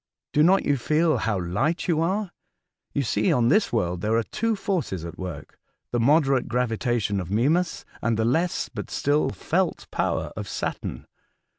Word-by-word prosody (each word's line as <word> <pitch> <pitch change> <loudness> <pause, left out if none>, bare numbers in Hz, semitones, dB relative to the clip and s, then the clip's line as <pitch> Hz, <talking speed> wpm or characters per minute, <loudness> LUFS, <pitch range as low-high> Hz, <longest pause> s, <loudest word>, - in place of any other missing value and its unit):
Do 150 - +4
not 185 +5 +5
you 145 - +2
feel 155 +6 +2
how 105 -4 0
light 100 - -1
you 165 -3 +2
are? 190 +3 0 0.6
You 140 - 0
see 105 -3 +1
on 120 -1 +3
this 210 0 +3
world 90 -6 0
there 110 +3 +1
are 115 - +2
two 225 - -1
forces 180 - -2
^t 85 - -7
work 85 -6 -8 0.2
— - - -56
the 120 - 0
moderate 135 0 +3
gravitation 120 -3 0
of 90 -2 -5
Mimas 150 - +1 0.2
and 115 -1 +1
the 110 - +1
less 165 +9 +1
but - - -7
still 145 +2 +1
felt 180 0 -1
power - - -1
of - - -5
Saturn. - - -4
125 Hz, 175 wpm, -25 LUFS, 110-165 Hz, 0.6 s, not